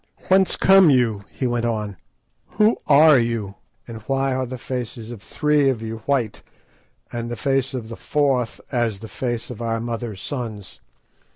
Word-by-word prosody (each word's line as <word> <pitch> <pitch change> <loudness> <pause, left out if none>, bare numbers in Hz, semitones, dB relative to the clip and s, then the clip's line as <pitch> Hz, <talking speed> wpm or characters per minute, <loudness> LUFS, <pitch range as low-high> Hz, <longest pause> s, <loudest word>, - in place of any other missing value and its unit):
"Whence 190 0 +4
come 195 -3 +6
you?" 115 -7 +2
he 130 - -4
went 120 -1 0
on, 105 -3 -2 0.6
"who 215 +2 +5
are 150 -1 +7
you? 115 -4 -2 0.3
and 115 -2 -8
why 135 0 +1
are 130 0 -1
the 130 +1 -6
faces 120 -2 -5
of 115 -4 -9
three 150 +3 +2
of 130 -4 -1
you 115 0 -6
white, 125 -7 0 0.7
and 120 0 -4
the 120 - -4
face 135 0 0
of 120 -3 -5
the 115 - -7
fourth 135 -5 0
as 120 -5 0
the 110 +3 -9
face 120 0 -4
of 120 - -8
our 115 -1 -1
mother's 115 -3 -4
sons?" 110 -7 -6
120 Hz, 170 wpm, -22 LUFS, 115-135 Hz, 0.7 s, are